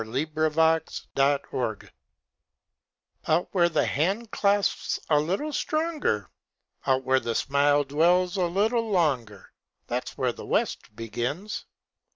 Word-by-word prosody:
_ - - -2 0.3
Where 155 +1 +1
the 150 - -15
West 160 0 +1
Begins 135 -5 0 1.4
Out 165 +3 +2
where 175 -3 +4
the 155 - +1
handclasp's 200 +4 0
a 150 - +6
little 195 - -2
stronger, 310 - -1 0.6
Out 130 -1 +2
where 130 +1 +3
a 115 -1 -2
smile 145 +1 +3
dwells 175 +6 +2
a 185 -3 +1
little 220 +6 +1
longer, 130 - 0 0.3
That's - - -4
where - - 0
the - - -10
West 105 - -1
begins. 120 - -4
160 Hz, 125 wpm, -26 LUFS, 135-195 Hz, 1.4 s, a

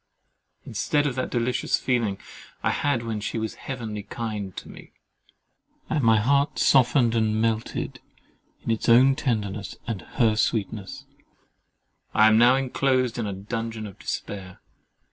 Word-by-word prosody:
Instead 145 +7 0
of 140 - 0
that 130 +1 -2
delicious 120 0 0
feeling 115 -6 0 0.5
I - - +2
had 140 -5 0
when 110 -2 -3
she 105 - -3
was 110 -1 -2
heavenly 115 -6 -6
kind 105 -3 -5
to - - -7
me, - - -13 1.0
and 150 -3 +1
my 110 -1 +5
heart 140 +6 +2
softened 125 -2 +4
and 110 -1 +1
melted 115 0 -1 0.6
in - - -1
its 115 +1 -1
own 130 +3 +6
tenderness 105 -6 -2
and 115 -5 -4 0.2
her 115 -4 +4
sweetness, 105 -2 -2 1.1
I 110 - +6
am 110 0 +6
now 120 +2 +6
inclosed 130 -2 +1
in 110 - -1
a 100 - -3
dungeon 110 +2 -4
of 100 -3 -10
despair. 95 -2 -5
115 Hz, 145 wpm, -25 LUFS, 110-125 Hz, 1.1 s, own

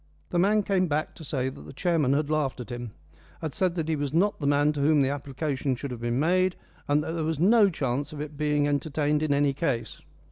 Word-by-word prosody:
The 175 - +1
man 210 +3 +3
came 190 -2 +1
back 155 0 -1
to - - -11
say 130 -3 -1
that 130 - -11
the - - -11
chairman 155 -4 +1
had 145 +1 +1
laughed 150 -4 0
at 125 +1 -7
him 120 -1 -5 0.5
had 155 -4 -4
said 185 -3 0
that 165 -3 -2
he 160 - +1
was 145 -2 -2
not 200 +5 +2
the 145 - -1
man 145 +1 +3
to 145 - -3
whom 150 0 +4
the 135 - +2
application 140 -1 -2
should 135 +2 -6
have 120 -2 -6
been 120 +1 0
made, 185 +4 +2 0.3
and 145 +1 +2
that - - -4
there 165 -1 -2
was 160 -1 -1
no 205 +3 +5
chance 140 -3 -2
of 150 - -8
its 150 0 -5
being 150 0 +1
entertained 150 +1 0
in 155 -2 0
any 140 0 +3
case. 130 -7 -2
150 Hz, 245 wpm, -27 LUFS, 140-160 Hz, 0.5 s, no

